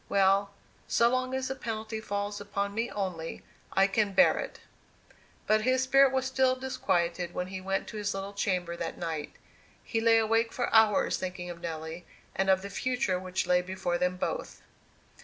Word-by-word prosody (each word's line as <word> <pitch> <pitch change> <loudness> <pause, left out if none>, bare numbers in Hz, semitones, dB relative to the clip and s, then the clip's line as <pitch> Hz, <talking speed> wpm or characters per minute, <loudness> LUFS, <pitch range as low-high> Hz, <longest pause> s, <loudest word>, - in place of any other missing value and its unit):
Well, 195 0 +3 0.4
so 235 0 +4
long 255 +1 0
as 265 0 -2
the - - -1
penalty 220 -3 -5
falls 205 -1 -3
upon 200 0 -3
me 230 +3 -1
only, 180 -5 -4 0.3
I 195 - +4
can 200 0 +1
bear 275 - +5
it!" - - -5 0.9
But 215 0 +3
his 255 +3 +2
spirit 270 +1 +5
was 260 -1 0
still 260 0 +2
disquieted 175 -9 -1
when 180 - -1
he 190 0 -6
went 195 +1 -2
to 220 - -7
his 205 -1 -2
little 195 +1 -5
chamber 180 -4 -1
that 165 -1 -5
night. 160 -3 -4 0.5
He 225 - -1
lay 225 0 +5
awake 225 +1 +2
for 245 - -2
hours 220 -2 +4
thinking 180 -1 -5
of 170 -1 -10
Nelly, 160 0 -6 0.3
and 195 +1 +1
of 190 0 +4
the 200 - -5
future 220 -5 0
which 185 0 -2
lay 180 0 +3
before 180 -1 -2
them 180 0 0
both. - - -4
200 Hz, 180 wpm, -29 LUFS, 180-230 Hz, 0.9 s, bear